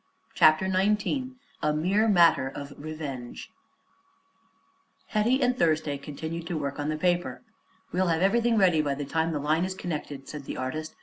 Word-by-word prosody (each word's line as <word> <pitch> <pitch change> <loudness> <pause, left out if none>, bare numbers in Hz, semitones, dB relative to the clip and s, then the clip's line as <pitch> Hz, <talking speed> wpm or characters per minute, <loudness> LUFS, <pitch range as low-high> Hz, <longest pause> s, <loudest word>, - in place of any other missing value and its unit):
CHAPTER 155 +4 +5
XIX 210 +7 0 0.3
A 150 0 +1
MERE 190 +8 +2
MATTER 170 -9 +5
OF 140 +1 -7
REVENGE 145 -5 -7 1.6
Hetty 240 +5 +2
and 250 0 +2
Thursday 155 - +1
continued 160 +4 -6
to 175 - -2
work 140 -1 -4
on 145 +1 -2
the 155 - -1
paper. 175 +5 0 0.5
"We'll 185 +1 +1
have 165 +1 +1
everything 230 +3 +3
ready 180 -6 +4
by 145 -2 -1
the 145 +1 -4
time 160 +3 0
the 155 - -1
line 155 +4 +1
is 185 0 -3
connected," 150 -6 -5
said 150 -2 -7
the - - -5
artist. 155 +5 -4
160 Hz, 165 wpm, -27 LUFS, 150-190 Hz, 1.6 s, CHAPTER